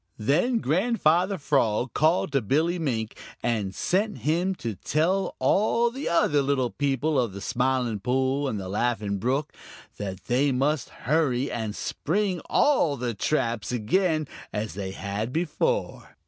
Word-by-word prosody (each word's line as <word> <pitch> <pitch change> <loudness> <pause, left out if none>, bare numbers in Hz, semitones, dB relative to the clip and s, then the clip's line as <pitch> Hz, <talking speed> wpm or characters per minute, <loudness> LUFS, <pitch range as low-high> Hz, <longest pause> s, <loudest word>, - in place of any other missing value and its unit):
Then 155 - +2
Grandfather 185 - +2
Frog 125 -5 +1
called 160 0 +2
to 135 -1 +2
Billy 160 - +1
Mink 115 -8 -2 0.3
and 105 -5 -1
sent 205 +4 0
him 175 +5 +1
to 115 -9 -4
tell 170 - 0
all 230 +3 +2
the 270 +4 -4
other 150 -3 +3
little 135 -3 0
people 145 +1 0
of 120 -6 0
the 100 - -6
Smiling 125 -1 0
Pool 130 +4 0
and 110 -5 -2
the 95 - -6
Laughing 105 -1 -1
Brook 135 +7 -1 0.4
that 95 -2 -5
they 135 +4 +2
must 135 +1 0
hurry 140 -1 0
and 110 -3 -3
spring 185 +2 -1
all 170 - +3
the 120 -1 -2
traps 115 -4 -1
again 155 - +1 0.2
as 105 0 -3
they 95 0 -4
had 100 +4 -4
before. 175 - -2
135 Hz, 145 wpm, -26 LUFS, 115-165 Hz, 0.4 s, other